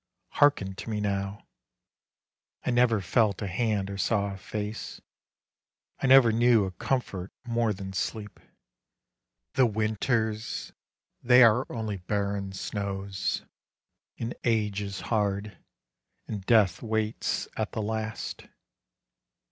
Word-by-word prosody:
Hearken 100 Hz, -10 st, +3 dB
to -, -, -7 dB
me 105 Hz, -1 st, -1 dB
now: 100 Hz, 0 st, -2 dB, 1.2 s
I -, -, +1 dB
never 120 Hz, -3 st, +3 dB
felt 100 Hz, +1 st, +2 dB
a -, -, -3 dB
hand 105 Hz, 0 st, 0 dB
or 100 Hz, 0 st, -6 dB
saw 100 Hz, 0 st, +1 dB
a -, -, -8 dB
face, 105 Hz, +2 st, -5 dB, 1.0 s
I -, -, +2 dB
never 130 Hz, -3 st, +8 dB
knew 115 Hz, -2 st, +4 dB
a 95 Hz, -, -4 dB
comfort 105 Hz, -3 st, -2 dB
more 115 Hz, -2 st, +1 dB
than 95 Hz, -1 st, -6 dB
sleep, 105 Hz, +3 st, -4 dB, 1.1 s
The 130 Hz, -2 st, +4 dB
winters 110 Hz, +1 st, -1 dB, 0.5 s
they 125 Hz, +1 st, +7 dB
are 115 Hz, +3 st, +4 dB
only 110 Hz, -3 st, -3 dB
barren 100 Hz, +1 st, -2 dB
snows, 100 Hz, 0 st, -3 dB, 0.7 s
And 115 Hz, +1 st, -3 dB
age 105 Hz, -4 st, +1 dB
is 100 Hz, -1 st, -5 dB
hard, 105 Hz, -2 st, -1 dB, 0.7 s
and 105 Hz, -3 st, -5 dB
death 110 Hz, -6 st, +4 dB
waits 110 Hz, -1 st, -1 dB
at -, -, -3 dB
the 110 Hz, -, -2 dB
last. 110 Hz, 0 st, -4 dB
105 Hz, 115 wpm, -28 LUFS, 100-115 Hz, 1.2 s, never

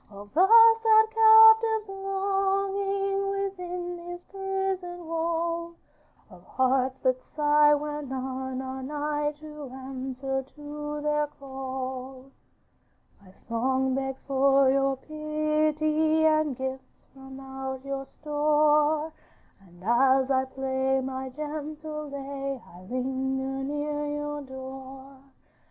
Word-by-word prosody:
'Of 205 Hz, 0 st, -12 dB
the 360 Hz, +6 st, +5 dB
sad 450 Hz, 0 st, +7 dB
captive's 445 Hz, -1 st, +7 dB
longing 390 Hz, 0 st, -1 dB
Within 360 Hz, -3 st, -4 dB
his 350 Hz, 0 st, -8 dB
prison 385 Hz, -2 st, -4 dB
wall, 335 Hz, +1 st, -2 dB, 0.6 s
Of 180 Hz, -1 st, -14 dB
hearts 260 Hz, +3 st, +1 dB
that 255 Hz, -1 st, +1 dB
sigh 295 Hz, 0 st, +3 dB
when 295 Hz, -1 st, -4 dB
none 260 Hz, 0 st, -4 dB
are 265 Hz, 0 st, -6 dB
nigh 295 Hz, +2 st, -2 dB
To 300 Hz, -2 st, -10 dB
answer 265 Hz, 0 st, -4 dB
to 295 Hz, 0 st, -6 dB
their 300 Hz, 0 st, +1 dB
call. 265 Hz, -1 st, -7 dB, 0.9 s
'My 195 Hz, -, -18 dB, 0.2 s
song 260 Hz, +3 st, 0 dB
begs 270 Hz, 0 st, -3 dB
for 275 Hz, 0 st, +4 dB
your 275 Hz, 0 st, +2 dB
pity, 310 Hz, +1 st, 0 dB
And 310 Hz, -4 st, +2 dB
gifts 265 Hz, 0 st, -7 dB
from 265 Hz, 0 st, -11 dB
out 265 Hz, 0 st, -6 dB
your 275 Hz, -1 st, -4 dB
store, 300 Hz, +1 st, +2 dB, 0.5 s
And 180 Hz, -2 st, -19 dB
as 260 Hz, +4 st, +3 dB
I 260 Hz, 0 st, +2 dB
play 265 Hz, 0 st, -1 dB
my 260 Hz, 0 st, -4 dB
gentle 305 Hz, +1 st, -6 dB
lay 275 Hz, -1 st, -5 dB, 0.2 s
I 180 Hz, -, -13 dB
linger 265 Hz, +1 st, -2 dB
near 295 Hz, +1 st, -2 dB
your 295 Hz, 0 st, -4 dB
door. 265 Hz, 0 st, -10 dB
290 Hz, 105 wpm, -27 LUFS, 265-315 Hz, 0.9 s, sad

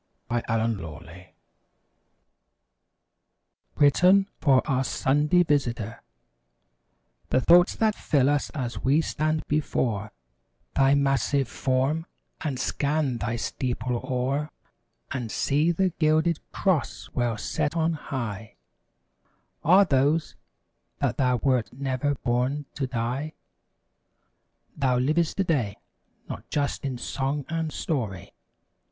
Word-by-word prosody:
THE 120 Hz, 0 st, 0 dB
MOTHER 115 Hz, -2 st, 0 dB
CHURCH 80 Hz, +3 st, -10 dB, 2.5 s
{Written 180 Hz, +7 st, +5 dB
for 135 Hz, -3 st, +3 dB
"Our 130 Hz, -2 st, +1 dB
Sunday 150 Hz, +7 st, +2 dB
Visitor') 120 Hz, -8 st, -1 dB, 1.3 s
The -, -, +3 dB
thoughts 175 Hz, +7 st, +5 dB
that 220 Hz, -1 st, +2 dB
fill 140 Hz, -9 st, +1 dB
us 145 Hz, 0 st, +1 dB
as 125 Hz, -4 st, -3 dB
we 140 Hz, +5 st, +3 dB
stand 155 Hz, -1 st, -1 dB
before 115 Hz, -8 st, -1 dB, 0.6 s
Thy 135 Hz, 0 st, +4 dB
massive 135 Hz, -1 st, +1 dB
form 135 Hz, +7 st, 0 dB, 0.4 s
and 140 Hz, -5 st, -2 dB
scan 140 Hz, -3 st, 0 dB
thy 115 Hz, +1 st, -2 dB
steeple 125 Hz, +1 st, -2 dB
o'er 135 Hz, +3 st, -1 dB, 0.6 s
And 120 Hz, -4 st, -3 dB
see 150 Hz, +5 st, +2 dB
the 185 Hz, +2 st, +1 dB
gilded 155 Hz, +1 st, +3 dB
cross 185 Hz, -7 st, -1 dB
well 120 Hz, -3 st, 0 dB
set 145 Hz, +7 st, -2 dB
on 165 Hz, 0 st, +2 dB
high 115 Hz, -8 st, -5 dB, 1.1 s
Are 190 Hz, +5 st, +6 dB
those: 145 Hz, +3 st, +1 dB, 0.6 s
That -, -, -1 dB
thou 125 Hz, -2 st, +2 dB
wert 125 Hz, -2 st, +1 dB
never 135 Hz, +2 st, -1 dB
born 130 Hz, +4 st, -1 dB
to 140 Hz, -2 st, -2 dB
die! 125 Hz, +5 st, -3 dB, 1.4 s
Thou 130 Hz, -4 st, +1 dB
liv'st 155 Hz, +6 st, +1 dB
today, 145 Hz, -, 0 dB, 0.5 s
not -, -, -8 dB
just 145 Hz, -1 st, -1 dB
in 130 Hz, -2 st, -2 dB
song 135 Hz, +3 st, -2 dB
and 165 Hz, -1 st, -2 dB
story. 110 Hz, -, -3 dB
135 Hz, 110 wpm, -26 LUFS, 125-155 Hz, 2.5 s, Are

